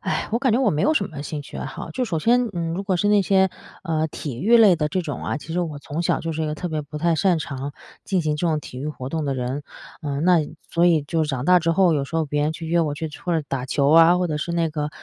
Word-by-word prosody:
唉， -, -, -2 dB
我 230 Hz, -, +2 dB
感 260 Hz, 0 st, +2 dB
觉 230 Hz, -, +3 dB
我 255 Hz, -6 st, +3 dB
没 150 Hz, -, -1 dB
有 310 Hz, -, +3 dB
什 200 Hz, -9 st, +1 dB
么 145 Hz, -2 st, -7 dB
兴 150 Hz, 0 st, -5 dB
趣 -, -, -9 dB
爱 -, -, -4 dB
好。 -, -, -7 dB
就 255 Hz, -, -3 dB
首 170 Hz, -9 st, -1 dB
先 240 Hz, +6 st, +3 dB
嗯， 165 Hz, -1 st, -2 dB
如 190 Hz, +4 st, -3 dB
果 190 Hz, -2 st, 0 dB
是 205 Hz, +4 st, +1 dB
那 205 Hz, -1 st, +5 dB
些， 190 Hz, 0 st, +3 dB, 0.3 s
呃， 160 Hz, -3 st, 0 dB
体 135 Hz, -5 st, -6 dB
育 235 Hz, +4 st, +5 dB
类 210 Hz, -6 st, +7 dB
的 150 Hz, -2 st, -1 dB
这 180 Hz, +4 st, -1 dB
种 150 Hz, -4 st, -5 dB
啊， -, -, -2 dB
其 160 Hz, +2 st, -8 dB
实 180 Hz, -, 0 dB
我 155 Hz, -4 st, -4 dB
从 145 Hz, +3 st, -5 dB
小 170 Hz, -, +1 dB
就 165 Hz, 0 st, -3 dB
是 160 Hz, +1 st, -3 dB
一 -, -, -1 dB
个 150 Hz, -, -2 dB
特 180 Hz, -, -5 dB
别 155 Hz, -1 st, -2 dB
不 150 Hz, +1 st, -9 dB
太 165 Hz, +2 st, +1 dB
擅 175 Hz, +2 st, +2 dB
长 140 Hz, -3 st, -5 dB, 0.3 s
进 185 Hz, -3 st, 0 dB
行 150 Hz, -1 st, 0 dB
这 175 Hz, -, -1 dB
种 155 Hz, -2 st, +1 dB
体 125 Hz, -3 st, -9 dB
育 145 Hz, -, -4 dB
活 135 Hz, -3 st, -6 dB
动 160 Hz, -3 st, -2 dB
的 135 Hz, -, 0 dB
人， 130 Hz, +3 st, -3 dB, 0.4 s
呃， 145 Hz, -3 st, -3 dB
那 180 Hz, 0 st, +5 dB, 0.3 s
所 170 Hz, +1 st, +3 dB
以 160 Hz, -4 st, +4 dB
就 160 Hz, +2 st, -1 dB
长 140 Hz, -4 st, -2 dB
大 180 Hz, +2 st, +6 dB
之 165 Hz, 0 st, 0 dB
后， 180 Hz, -1 st, +4 dB
有 140 Hz, -2 st, 0 dB
时 165 Hz, -, -4 dB
候 160 Hz, -, +1 dB
别 145 Hz, 0 st, -2 dB
人 155 Hz, +1 st, 0 dB
去 165 Hz, -, -7 dB
约 170 Hz, +1 st, +2 dB
我 150 Hz, -3 st, 0 dB
去 160 Hz, +1 st, -5 dB
或 175 Hz, -3 st, 0 dB
者 155 Hz, -, -5 dB
打 130 Hz, -2 st, -3 dB
球 140 Hz, +2 st, +2 dB
啊， 165 Hz, +2 st, +7 dB
或 180 Hz, 0 st, 0 dB
者 150 Hz, -2 st, -2 dB
是 170 Hz, +3 st, -3 dB
那 165 Hz, -2 st, 0 dB
个 150 Hz, -1 st, -2 dB
160 Hz, 330 characters per minute, -23 LUFS, 150-180 Hz, 0.4 s, 类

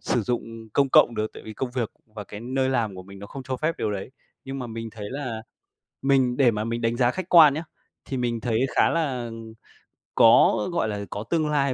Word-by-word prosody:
sử 120 Hz, -, 0 dB
dụng 115 Hz, -1 st, -4 dB
công 140 Hz, +2 st, +3 dB
cộng 120 Hz, -2 st, +5 dB
được 110 Hz, 0 st, -2 dB
tại -, -, -10 dB
vì 110 Hz, -, -8 dB
công 125 Hz, +4 st, -4 dB
việc 120 Hz, -3 st, -2 dB, 0.2 s
và 105 Hz, -, -6 dB
cái 105 Hz, -, -9 dB
nơi 130 Hz, +2 st, -1 dB
làm 115 Hz, -6 st, 0 dB
của 95 Hz, -, -8 dB
mình 100 Hz, +1 st, -13 dB
nó 100 Hz, -, -9 dB
không 135 Hz, +5 st, -8 dB
cho 130 Hz, 0 st, -4 dB
phép 155 Hz, +5 st, 0 dB
điều -, -, -1 dB
đấy. 100 Hz, +3 st, -5 dB, 0.3 s
Nhưng 135 Hz, 0 st, -5 dB
mà 125 Hz, -, -4 dB
mình 115 Hz, 0 st, -6 dB
thấy 105 Hz, -2 st, -8 dB
là 130 Hz, -5 st, -5 dB, 0.6 s
mình 130 Hz, -3 st, +2 dB
để 130 Hz, -3 st, +5 dB
mà 105 Hz, -1 st, -3 dB
mình 115 Hz, +1 st, -3 dB
đánh 115 Hz, 0 st, 0 dB
giá 120 Hz, -1 st, +3 dB
khách 185 Hz, +6 st, -5 dB
quan 160 Hz, -6 st, +8 dB
nhá, 160 Hz, +3 st, -4 dB, 0.4 s
thì 135 Hz, -, -4 dB
mình 120 Hz, -2 st, -1 dB
thấy 115 Hz, -1 st, 0 dB, 0.2 s
khá -, -, +4 dB
là 130 Hz, -8 st, -1 dB, 0.9 s
có, 115 Hz, 0 st, +6 dB
gọi 170 Hz, -9 st, 0 dB
là, 105 Hz, -1 st, -4 dB
có 105 Hz, -, -5 dB
tương 160 Hz, -2 st, +1 dB
lai 140 Hz, -3 st, +1 dB
120 Hz, 235 wpm, -25 LUFS, 110-135 Hz, 0.9 s, quan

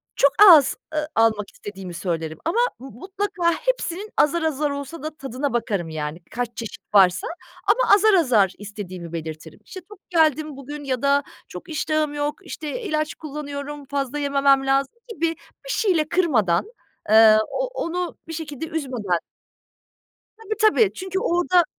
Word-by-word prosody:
çok 280 Hz, 0 st, +4 dB, 0.2 s
az, 300 Hz, -6 st, +7 dB, 0.2 s
ııı, 305 Hz, 0 st, -1 dB
almak 220 Hz, -2 st, +2 dB
istediğimi 195 Hz, -3 st, -8 dB
söylerim 165 Hz, -3 st, -3 dB
ama 345 Hz, +8 st, +1 dB, 0.2 s
m 265 Hz, -, -9 dB
mutlaka 375 Hz, -, -1 dB
hepsinin 430 Hz, -5 st, -2 dB
azar 335 Hz, +3 st, +3 dB
azar 300 Hz, -1 st, 0 dB
olsa 280 Hz, +2 st, -6 dB
da 310 Hz, -, -2 dB
tadına 270 Hz, 0 st, -3 dB
bakarım 200 Hz, -8 st, -1 dB
yani, 155 Hz, +1 st, -4 dB
kaç 245 Hz, 0 st, -2 dB
çeşit 230 Hz, -2 st, -6 dB
varsa 180 Hz, -3 st, +5 dB, 0.4 s
ama -, -, +4 dB
azar 425 Hz, +1 st, +4 dB
azar 235 Hz, -, +4 dB
istediğimi 185 Hz, -5 st, -8 dB
belirtirim. 160 Hz, -1 st, -7 dB
İşte, 375 Hz, -, -9 dB
tok 420 Hz, -3 st, -13 dB
geldim 310 Hz, -4 st, +2 dB
bugün 290 Hz, +2 st, -8 dB
ya 260 Hz, -3 st, -2 dB
da 280 Hz, 0 st, +3 dB, 0.2 s
çok 180 Hz, -, -10 dB
iştahım 310 Hz, -1 st, -1 dB
yok, 290 Hz, 0 st, -2 dB
işte, 320 Hz, +9 st, -5 dB
ilaç 310 Hz, -5 st, -1 dB
kullanıyorum, 290 Hz, -1 st, -7 dB
fazla 280 Hz, 0 st, -3 dB
yememem 275 Hz, -1 st, +3 dB
lazım 270 Hz, +5 st, +1 dB, 0.2 s
gibi, 335 Hz, -7 st, -1 dB, 0.4 s
bir -, -, -9 dB
şeyle 355 Hz, -11 st, +1 dB
kırmadan, 265 Hz, -, +2 dB, 0.5 s
ııı, 220 Hz, 0 st, +8 dB
o -, -, -2 dB, 0.2 s
onu 355 Hz, +1 st, -3 dB
bir 325 Hz, -, -6 dB
şekilde 310 Hz, -2 st, -5 dB
üzmeden. 255 Hz, -, -2 dB, 1.2 s
Tabii, 435 Hz, -1 st, -5 dB
tabii, 435 Hz, -1 st, +4 dB
çünkü 380 Hz, 0 st, -3 dB
orada 355 Hz, -4 st, +3 dB
285 Hz, 150 wpm, -23 LUFS, 225-335 Hz, 1.2 s, ııı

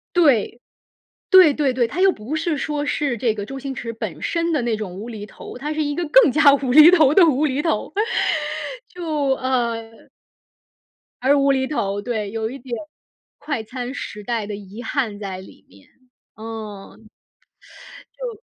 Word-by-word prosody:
对， 245 Hz, -, +3 dB, 0.7 s
对 370 Hz, -6 st, +8 dB
对 280 Hz, -3 st, 0 dB
对， 245 Hz, -2 st, +1 dB
它 350 Hz, -, -6 dB
又 385 Hz, 0 st, +6 dB
不 245 Hz, +6 st, -6 dB
是 320 Hz, 0 st, -1 dB
说 295 Hz, 0 st, -2 dB
是 275 Hz, -6 st, -1 dB
这 225 Hz, -1 st, +1 dB
个 205 Hz, -2 st, -5 dB
周 270 Hz, +3 st, -7 dB
星 270 Hz, 0 st, -5 dB
驰 230 Hz, -2 st, -5 dB
本 225 Hz, -, -6 dB
身 335 Hz, 0 st, -1 dB
的 290 Hz, -, +1 dB
那 235 Hz, -2 st, 0 dB
种 205 Hz, -4 st, -6 dB
无 210 Hz, +6 st, -7 dB
厘 210 Hz, -3 st, -7 dB
头， 210 Hz, -, -11 dB
它 300 Hz, +4 st, -4 dB
是 310 Hz, 0 st, -1 dB
一 290 Hz, 0 st, -2 dB
个 345 Hz, -, -2 dB
更 -, -, +6 dB
加 290 Hz, -1 st, +6 dB
无 265 Hz, -3 st, -2 dB
厘 310 Hz, +5 st, +9 dB
头 310 Hz, -6 st, +5 dB
的 360 Hz, +1 st, +7 dB
无 300 Hz, 0 st, +2 dB
厘 280 Hz, +1 st, 0 dB
头。 300 Hz, -5 st, -1 dB, 1.0 s
就 355 Hz, -1 st, -10 dB, 0.3 s
呃 235 Hz, -3 st, -2 dB, 1.3 s
而 280 Hz, +2 st, +4 dB
无 275 Hz, 0 st, +3 dB
厘 265 Hz, -1 st, 0 dB
头 205 Hz, -8 st, -2 dB
对， 215 Hz, -3 st, -3 dB
有 225 Hz, 0 st, -3 dB
一 270 Hz, -, -8 dB
点， 240 Hz, -1 st, -5 dB, 0.6 s
快 285 Hz, -7 st, -4 dB
餐 250 Hz, +3 st, -6 dB
时 210 Hz, -6 st, -7 dB
代 230 Hz, -2 st, -2 dB
的 205 Hz, -1 st, -5 dB
遗 205 Hz, +4 st, -10 dB
憾 235 Hz, -8 st, -2 dB
在 195 Hz, -2 st, -5 dB
里 190 Hz, -, -15 dB
面， 95 Hz, 0 st, -20 dB, 0.5 s
嗯。 215 Hz, -3 st, -8 dB, 1.2 s
就 470 Hz, -4 st, -6 dB
255 Hz, 190 characters per minute, -21 LUFS, 220-295 Hz, 1.3 s, 厘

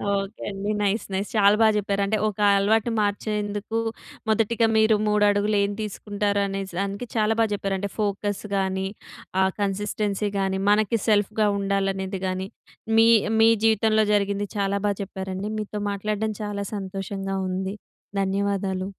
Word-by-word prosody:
Okay 195 Hz, +2 st, -4 dB
అండి. 200 Hz, +1 st, -3 dB
Nice 205 Hz, +2 st, 0 dB
nice. 195 Hz, +2 st, -2 dB
చాలా 200 Hz, 0 st, +6 dB
బాగా 220 Hz, -1 st, +5 dB
చెప్పారు 200 Hz, -1 st, -1 dB
అంటే 215 Hz, +2 st, 0 dB
ఒక 210 Hz, -1 st, -5 dB, 0.2 s
అలవాటు 220 Hz, +3 st, +2 dB
మార్చేందుకు 210 Hz, +1 st, -2 dB, 0.5 s
మొదటిగా 225 Hz, +1 st, +2 dB
మీరు 220 Hz, 0 st, +5 dB
3 210 Hz, 0 st, +3 dB
అడుగులు 205 Hz, +1 st, +1 dB
ఏం 200 Hz, -, 0 dB
తీసుకుంటారు? 205 Hz, 0 st, -2 dB
అనే 195 Hz, 0 st, -3 dB, 0.2 s
దానికి 200 Hz, +4 st, -3 dB
చాలా 220 Hz, 0 st, +2 dB
బాగా 225 Hz, -1 st, +3 dB
చెప్పారండి. 195 Hz, 0 st, -2 dB
ఫోకస్ 205 Hz, -1 st, -1 dB
కానీ, 190 Hz, 0 st, 0 dB, 0.5 s
ఆ -, -, +5 dB, 0.2 s
కన్సిస్టెన్సీ 205 Hz, +1 st, -1 dB
కానీ, 190 Hz, 0 st, 0 dB
మనకి 215 Hz, +2 st, +3 dB
సెల్ఫ్‌గా 215 Hz, 0 st, +2 dB
ఉండాలనేది 195 Hz, -1 st, -1 dB
కానీ, 185 Hz, +1 st, -2 dB, 0.5 s
మీ 225 Hz, 0 st, +7 dB, 0.3 s
మీ 225 Hz, -, +7 dB, 0.2 s
జీవితంలో 220 Hz, 0 st, +3 dB
జరిగింది 200 Hz, 0 st, +1 dB
చాలా 200 Hz, 0 st, 0 dB
బాగా 200 Hz, -, -1 dB
చెప్పారండి. 190 Hz, +1 st, -5 dB
మీతో 210 Hz, 0 st, -4 dB
మాట్లాడడం 215 Hz, +2 st, -2 dB
చాలా 200 Hz, -1 st, -3 dB
సంతోషంగా 195 Hz, 0 st, -4 dB
ఉంది. 190 Hz, +2 st, -3 dB, 0.5 s
ధన్యవాదాలు. 195 Hz, -1 st, -1 dB
200 Hz, 140 wpm, -24 LUFS, 195-210 Hz, 0.5 s, మీ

